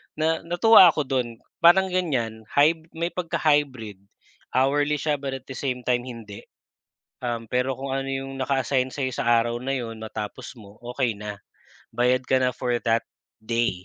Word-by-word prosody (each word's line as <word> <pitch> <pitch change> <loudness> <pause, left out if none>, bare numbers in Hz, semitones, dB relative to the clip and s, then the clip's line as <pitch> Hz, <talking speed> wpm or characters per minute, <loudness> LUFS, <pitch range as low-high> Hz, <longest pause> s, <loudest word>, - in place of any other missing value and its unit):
Na 160 +1 +1
natuwa 175 +3 +7
ako 150 - -1
do'n 120 -3 -2 0.2
parang 190 +3 +7
ganyan 130 -12 -1
hyb 160 +3 +3
may 170 +1 -1
pagka 175 -2 -3
hybrid. 130 -10 0 0.5
Hourly 145 +3 +2
siya 150 -1 0
but 135 -1 -4
at 130 - -10
the 135 - -7
same 125 -3 -3
time, 125 0 +1
hindi. 110 -4 -9 0.8
Um, 115 -2 -3
pero 125 +2 -1
kung 135 0 -3
ano 135 0 -2
yung 135 0 -4
naka-assign 130 -1 0
sa'yo 130 -1 -2
sa - - -3
araw 120 +1 -1
na 135 +1 -1
'yon 115 -2 -6
matapos 110 +1 -6
mo, 100 0 -15 0.2
okey 125 -4 0
na. 105 -1 -6 0.5
Bayad 125 +1 +2
ka 130 0 +2
na 130 - +3
for 125 0 -2
that 115 0 +2 0.4
day. 110 -5 -1
130 Hz, 170 wpm, -24 LUFS, 115-145 Hz, 0.8 s, natuwa